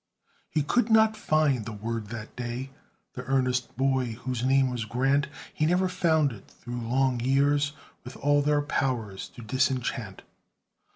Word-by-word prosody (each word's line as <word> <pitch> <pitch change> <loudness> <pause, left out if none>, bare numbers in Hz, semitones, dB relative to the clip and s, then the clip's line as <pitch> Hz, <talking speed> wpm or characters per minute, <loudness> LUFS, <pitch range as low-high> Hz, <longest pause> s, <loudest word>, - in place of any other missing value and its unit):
He 155 - 0
could 240 +9 +1
not 220 0 +5
find 155 - +1
the 115 - -6
word 110 +1 -4
that 110 0 -8
day, 125 +2 -4 0.4
The 125 - -6
earnest 130 -2 0
boy 130 -3 +1
whose 125 +1 -4
name 135 0 +3
was 120 -2 -2
Grant; 135 +6 +1 0.3
He 155 - +1
never 180 +2 +2
found 160 -5 +2
it 105 -4 -12
through 120 0 -7
long 125 +2 +1
years, 140 +3 +2 0.3
With 125 - -9
all 145 +1 +3
their 145 0 +2
power 125 -8 -1
to 120 - -9
disenchant. 120 -4 -1
130 Hz, 155 wpm, -27 LUFS, 120-145 Hz, 0.4 s, not